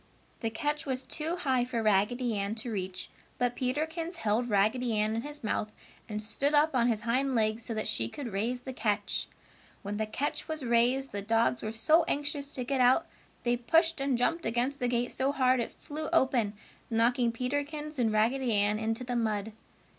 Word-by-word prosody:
The 225 Hz, -, -1 dB
catch 295 Hz, +6 st, -2 dB
was 260 Hz, -1 st, -1 dB
too 320 Hz, +5 st, -2 dB
high 265 Hz, -8 st, +1 dB
for 240 Hz, -2 st, -2 dB
Raggedy 220 Hz, +4 st, +2 dB
Ann 200 Hz, +1 st, -1 dB
to 230 Hz, +1 st, -3 dB
reach, 185 Hz, -2 st, -4 dB, 0.3 s
but 245 Hz, -1 st, 0 dB
Peterkins 320 Hz, +7 st, -2 dB
held 240 Hz, -4 st, 0 dB
Raggedy 220 Hz, +3 st, +2 dB
Ann 215 Hz, +1 st, +1 dB
in 230 Hz, -, -1 dB
his 295 Hz, +1 st, -8 dB
mouth 215 Hz, 0 st, -1 dB, 0.4 s
and 210 Hz, -1 st, -3 dB
stood 275 Hz, +7 st, 0 dB
up 300 Hz, +1 st, +4 dB
on 240 Hz, -2 st, +3 dB
his 225 Hz, -3 st, +1 dB
hind 255 Hz, +3 st, +1 dB
legs 220 Hz, 0 st, +1 dB
so 230 Hz, -, -3 dB
that 215 Hz, -, -2 dB
she 115 Hz, 0 st, -1 dB
could 245 Hz, -8 st, -6 dB
raise 235 Hz, +5 st, -1 dB
the 260 Hz, +1 st, -6 dB
catch. 210 Hz, -3 st, -1 dB, 0.6 s
When 205 Hz, +1 st, -3 dB
the 220 Hz, 0 st, -1 dB
catch 285 Hz, +7 st, -2 dB
was 315 Hz, -4 st, -4 dB
raised, 245 Hz, +3 st, +2 dB
the 200 Hz, -, -3 dB
dogs 225 Hz, +3 st, +2 dB
were 215 Hz, -, -3 dB
so 310 Hz, +10 st, +4 dB
anxious 285 Hz, 0 st, -1 dB
to 255 Hz, -, -2 dB
get 260 Hz, +1 st, 0 dB
out 255 Hz, +6 st, +5 dB, 0.4 s
they 240 Hz, 0 st, +2 dB
pushed 325 Hz, +6 st, +2 dB
and 275 Hz, -2 st, +1 dB
jumped 330 Hz, +7 st, +1 dB
against 245 Hz, +5 st, 0 dB
the 245 Hz, -, +1 dB
gate 245 Hz, 0 st, 0 dB
so 265 Hz, +1 st, 0 dB
hard 260 Hz, -2 st, +3 dB
it 235 Hz, -, -1 dB
flew 310 Hz, 0 st, -6 dB
open, 255 Hz, -9 st, +2 dB, 0.4 s
knocking 235 Hz, +1 st, +2 dB
Peterkins 290 Hz, +4 st, -3 dB
and 225 Hz, -3 st, +3 dB
Raggedy 235 Hz, +4 st, +2 dB
Ann 205 Hz, +1 st, +2 dB
into 225 Hz, +2 st, -1 dB
the 245 Hz, 0 st, -3 dB
mud. 220 Hz, -2 st, -1 dB
245 Hz, 195 wpm, -30 LUFS, 220-275 Hz, 0.6 s, out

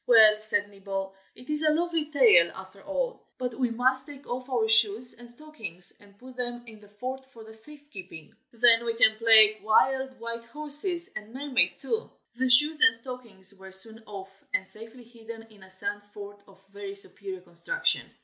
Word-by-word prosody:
"Well," 220 Hz, -3 st, +6 dB
said 205 Hz, -1 st, -2 dB
Nibble, 195 Hz, -1 st, -6 dB, 0.2 s
"it 250 Hz, -, -16 dB
is 300 Hz, 0 st, +2 dB
a 310 Hz, -, +3 dB
lovely 325 Hz, -1 st, -1 dB
tail, 445 Hz, +10 st, +5 dB
after -, -, -12 dB
all. -, -, -4 dB, 0.2 s
But 250 Hz, -2 st, -4 dB
we 250 Hz, +1 st, -1 dB
must 260 Hz, +4 st, 0 dB
take 285 Hz, -1 st, -13 dB
off 250 Hz, +2 st, -6 dB
our 235 Hz, -4 st, 0 dB
shoes 225 Hz, +2 st, +5 dB
and 240 Hz, +1 st, -15 dB
stockings, 235 Hz, -, -4 dB
and 200 Hz, -1 st, -22 dB
put 255 Hz, +3 st, -14 dB
them 240 Hz, -1 st, -4 dB
in 220 Hz, -2 st, -14 dB
the 205 Hz, -, -18 dB
fort 255 Hz, +6 st, -7 dB
for 220 Hz, -3 st, -14 dB
safe 290 Hz, +6 st, -12 dB
keeping. 165 Hz, -6 st, -12 dB, 0.2 s
Then 235 Hz, 0 st, +5 dB
we 230 Hz, -1 st, -1 dB
can 220 Hz, -1 st, +4 dB
play 220 Hz, -1 st, +6 dB
'wild 265 Hz, +4 st, +1 dB
white 230 Hz, 0 st, -7 dB
horses' 305 Hz, +7 st, 0 dB
and 210 Hz, +1 st, -9 dB
'mermaid' 275 Hz, -2 st, 0 dB
too." 455 Hz, -1 st, -4 dB, 0.2 s
The 255 Hz, +2 st, -1 dB
shoes 295 Hz, +4 st, +4 dB
and 225 Hz, -, +8 dB
stockings 230 Hz, -6 st, -7 dB
were 190 Hz, -1 st, -14 dB
soon 220 Hz, +4 st, -3 dB
off, 195 Hz, -1 st, -11 dB
and -, -, -2 dB
safely 225 Hz, +4 st, -13 dB
hidden 230 Hz, -1 st, -12 dB
in 210 Hz, -2 st, -20 dB
a 190 Hz, -, -16 dB
sand 190 Hz, +2 st, -6 dB
fort 205 Hz, 0 st, -10 dB
of 195 Hz, 0 st, -22 dB
very 200 Hz, 0 st, -9 dB
superior 195 Hz, -1 st, -2 dB
construction. 180 Hz, -, -1 dB
230 Hz, 185 wpm, -26 LUFS, 205-260 Hz, 0.2 s, and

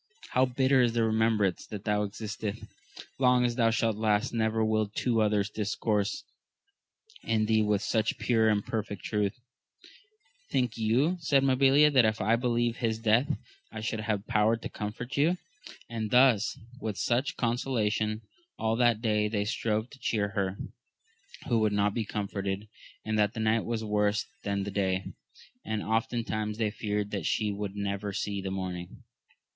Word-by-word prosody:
How 130 Hz, +1 st, +3 dB
bitter 130 Hz, +1 st, +3 dB
is 120 Hz, -2 st, +2 dB
the 115 Hz, -1 st, +2 dB
remembrance 110 Hz, -4 st, +1 dB
that 105 Hz, -2 st, -7 dB
thou 105 Hz, -1 st, +1 dB
excitest! 110 Hz, 0 st, -5 dB, 0.6 s
long 125 Hz, -1 st, +4 dB
as 120 Hz, -, +1 dB
thou 115 Hz, -2 st, +3 dB
shalt 115 Hz, -1 st, +1 dB
last, 110 Hz, +2 st, +1 dB
never 110 Hz, -1 st, +1 dB
will 110 Hz, -1 st, +1 dB
two 115 Hz, +2 st, 0 dB
others 105 Hz, -1 st, +2 dB
discourse 105 Hz, -1 st, -1 dB, 1.0 s
in 110 Hz, -1 st, +1 dB
thee 110 Hz, 0 st, +3 dB
with 105 Hz, -1 st, +1 dB
such 110 Hz, -1 st, 0 dB
pure 110 Hz, -2 st, +2 dB
and 105 Hz, -1 st, +1 dB
perfect 105 Hz, -3 st, -4 dB
truth! 105 Hz, 0 st, -1 dB, 1.1 s
Think 125 Hz, -3 st, 0 dB
you, 125 Hz, +11 st, +2 dB
said 140 Hz, -4 st, +2 dB
Mabilia, 135 Hz, +3 st, +5 dB
that 130 Hz, -3 st, +6 dB
if 110 Hz, 0 st, +1 dB
I 110 Hz, +4 st, +3 dB
believed 120 Hz, -1 st, 0 dB
his 115 Hz, -2 st, 0 dB
death 115 Hz, +7 st, +2 dB, 0.3 s
I -, -, -6 dB
should 110 Hz, 0 st, -2 dB
have 105 Hz, -1 st, -2 dB
power 110 Hz, 0 st, +2 dB
to -, -, -7 dB
comfort 115 Hz, +6 st, -5 dB
you 145 Hz, +2 st, +4 dB
1 180 Hz, +2 st, +1 dB, 0.5 s
and 110 Hz, -2 st, -3 dB
thus 125 Hz, -3 st, +4 dB, 0.2 s
with 110 Hz, -4 st, -4 dB
such 125 Hz, +3 st, 0 dB
consolation 110 Hz, -3 st, 0 dB, 0.3 s
all 110 Hz, 0 st, 0 dB
that 120 Hz, -2 st, +3 dB
day 105 Hz, -2 st, +2 dB
they 105 Hz, -1 st, -1 dB
strove 110 Hz, +1 st, -1 dB
to 140 Hz, -, -14 dB
cheer 105 Hz, -5 st, 0 dB
her 100 Hz, -2 st, -2 dB, 0.9 s
who 115 Hz, -, +2 dB
would 110 Hz, -1 st, +2 dB
not 100 Hz, 0 st, +2 dB
be 115 Hz, -1 st, -2 dB
comforted; 100 Hz, 0 st, -3 dB, 0.4 s
and 110 Hz, 0 st, 0 dB
the 105 Hz, -1 st, +4 dB
night 110 Hz, 0 st, +1 dB
was 115 Hz, -1 st, -2 dB
worse 105 Hz, 0 st, +1 dB, 0.2 s
than 100 Hz, -1 st, -1 dB
the 100 Hz, -, -4 dB
day, 95 Hz, -1 st, -1 dB, 0.5 s
and 110 Hz, -1 st, -3 dB
oftentimes 110 Hz, -1 st, -1 dB
they 110 Hz, -2 st, 0 dB
feared 105 Hz, -1 st, -2 dB
that 100 Hz, -, -2 dB
sfie 105 Hz, -2 st, 0 dB
would 100 Hz, -1 st, -4 dB
never 100 Hz, 0 st, -3 dB
see 100 Hz, +1 st, -3 dB
the 95 Hz, -, -4 dB
morning. 90 Hz, -2 st, -5 dB
110 Hz, 165 wpm, -29 LUFS, 105-115 Hz, 1.1 s, that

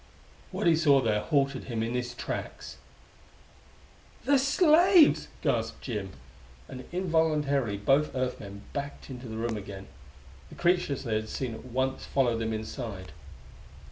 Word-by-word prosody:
What -, -, -3 dB
he 170 Hz, -1 st, +6 dB
saw 145 Hz, -4 st, +5 dB
there 110 Hz, -4 st, +1 dB
halted, 140 Hz, -2 st, 0 dB
him 115 Hz, -3 st, -2 dB
in 115 Hz, +1 st, -2 dB
his 120 Hz, -1 st, -3 dB
tracks. -, -, -6 dB, 1.5 s
"The 280 Hz, -1 st, +4 dB
slaves!" 320 Hz, +4 st, +5 dB, 0.2 s
gasped 115 Hz, -5 st, -1 dB
Jim, 105 Hz, -6 st, -4 dB, 0.5 s
and 130 Hz, -1 st, -8 dB
involuntarily 155 Hz, -, +1 dB
both 135 Hz, +9 st, +2 dB
Earth 130 Hz, -1 st, -1 dB
men 100 Hz, 0 st, -9 dB
backed 140 Hz, -1 st, -5 dB
into 125 Hz, -1 st, -8 dB
the 110 Hz, 0 st, -6 dB
room 115 Hz, 0 st, -1 dB
again. 100 Hz, -1 st, -8 dB, 0.6 s
The -, -, -12 dB
creatures 175 Hz, -6 st, +1 dB
they 115 Hz, -4 st, -2 dB
had 110 Hz, 0 st, -1 dB
seen 125 Hz, -1 st, -3 dB
at 110 Hz, -, -10 dB
once 130 Hz, +2 st, -2 dB
followed 120 Hz, -4 st, +1 dB
them 110 Hz, 0 st, -2 dB
inside. 110 Hz, -3 st, -5 dB
130 Hz, 140 wpm, -28 LUFS, 110-150 Hz, 1.5 s, he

